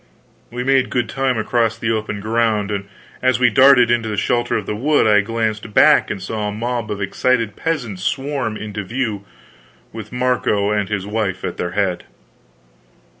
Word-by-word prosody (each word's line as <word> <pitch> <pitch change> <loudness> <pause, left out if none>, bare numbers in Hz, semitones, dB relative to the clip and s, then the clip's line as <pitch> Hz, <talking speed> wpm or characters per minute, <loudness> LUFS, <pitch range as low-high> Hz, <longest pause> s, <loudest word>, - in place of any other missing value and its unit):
We 125 +1 -4
made 135 0 +2
good 120 -2 -1
time 135 -2 0
across 115 0 0
the 115 - -1
open 105 -2 -3
ground, 110 -1 0
and 100 -1 -3 0.3
as 130 -1 +2
we 125 -1 +4
darted 130 -2 +6
into 115 -2 +1
the 105 - -3
shelter 120 +4 0
of - - -4
the 105 - -3
wood 145 +6 +2
I 105 -1 +5
glanced 110 0 -3
back - - +5
and 105 - -3
saw 105 +3 -4
a - - -2
mob 115 +1 -3
of 105 -1 -4
excited 115 +2 0
peasants 125 - -3
swarm 135 -2 -2
into 105 -1 -5
view, 110 -2 -3 0.7
with 110 -1 -8
Marco 125 -5 0
and 105 -2 -1
his 100 -2 -2
wife 105 -3 -2
at - - -4
their 90 0 -3
head. 95 -3 -1
110 Hz, 175 wpm, -19 LUFS, 105-125 Hz, 0.7 s, darted